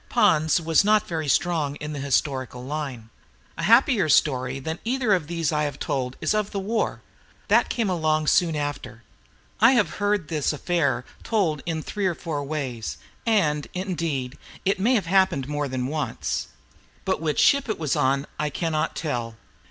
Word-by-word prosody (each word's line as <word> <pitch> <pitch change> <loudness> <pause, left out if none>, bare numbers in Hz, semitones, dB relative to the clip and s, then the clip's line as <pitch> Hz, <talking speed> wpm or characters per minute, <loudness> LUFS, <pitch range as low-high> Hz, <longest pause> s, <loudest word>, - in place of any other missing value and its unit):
Pons 155 +1 +3
was 165 0 +3
not 210 0 +3
very 160 -3 -3
strong 150 -1 +1
in 150 0 -6
the 145 - -5
historical 130 -2 -1
line. 130 -5 -5 0.4
A - - -5
happier 225 - +4
story 130 -3 +2
than 160 +5 -5
either 245 -2 +1
of 175 -6 0
these 165 -2 -1
I 150 -1 +1
have 145 -2 -4
told 130 -3 -3
is - - 0
of 210 -1 0
the 200 - -3
war. 215 +3 -2 0.5
That - - +4
came 230 -3 0
along 155 -4 +1
soon 165 +1 +3
after. 135 -5 -4 0.6
I 230 +5 +7
have 210 -10 +1
heard 205 -5 +1
this 150 -3 0
affair 150 -5 0 0.2
told 175 -10 0
in 160 -2 -2
three 205 -2 -2
or 175 - -1
four 150 -4 -4
ways, 135 -6 -4 0.3
and, 150 -10 +2
indeed, 165 -8 -3 0.3
it 195 +1 +1
may 235 +7 +3
have 210 - +1
happened 185 -7 +2
more 145 0 -2
than 130 -1 -3
once. 150 +3 -2 0.6
But 190 -4 0
which 155 -2 -1
ship 280 -3 +4
it 220 - -1
was 155 -3 -1
on 140 -1 +1
I 150 0 0
cannot 155 +1 -1
tell. 120 -7 -3
155 Hz, 175 wpm, -24 LUFS, 140-190 Hz, 0.6 s, I